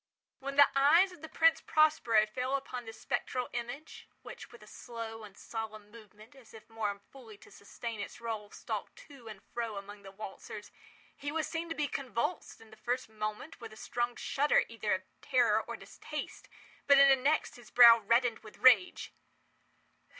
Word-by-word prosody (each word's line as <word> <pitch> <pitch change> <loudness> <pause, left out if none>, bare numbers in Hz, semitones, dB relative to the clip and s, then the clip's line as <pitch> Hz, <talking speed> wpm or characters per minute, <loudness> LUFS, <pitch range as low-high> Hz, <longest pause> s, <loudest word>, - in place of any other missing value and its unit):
When 275 +1 -5
the 285 0 +8
eyes 320 +8 +5
of 355 -4 -14
the 320 - -8
Prince 325 0 +3
Prospero 305 -9 +3
fell 250 +5 -2
upon 255 -3 -5
this 225 - -10
spectral 250 0 -2
image 245 +6 -7 0.2
(which, - - -10
with 240 -3 -14
a - - -13
slow 225 0 -8
and 200 -2 -13
solemn 215 -2 -7
movement, 215 +1 -15
as 235 -5 -16
if 220 - -14
more 210 -3 -3
fully 230 -6 -13
to - - -18
sustain 225 +2 -7
its 205 - -7
role, 220 -3 -5
stalked - - -6
to 270 -5 -14
and 210 -3 -9
fro 230 -3 -3
among 200 +1 -9
the 195 -1 -11
waltzers) 205 +1 -9 0.4
he 285 +1 -5
was 315 0 -1
seen 330 +1 -4
to 325 - -3
be 300 -1 0
convulsed, 260 - -3
in 225 -1 -17
the 220 - -15
first 245 +3 -3
moment 215 +7 -6
with 225 -1 -8
a - - -12
strong 240 +2 -2
shudder 290 +2 +2
either 220 -3 -1
of 185 - -7 0.2
terror 240 -5 +3
or - - -7
distaste; - - -8 0.4
but, 280 -1 +7
in 275 0 +8
the 270 - +7
next, 280 +4 0
his 240 -3 -15
brow 235 -1 +9
reddened 230 +2 +2
with 215 -1 -14
rage. 235 -8 +4
235 Hz, 185 wpm, -32 LUFS, 215-275 Hz, 0.4 s, brow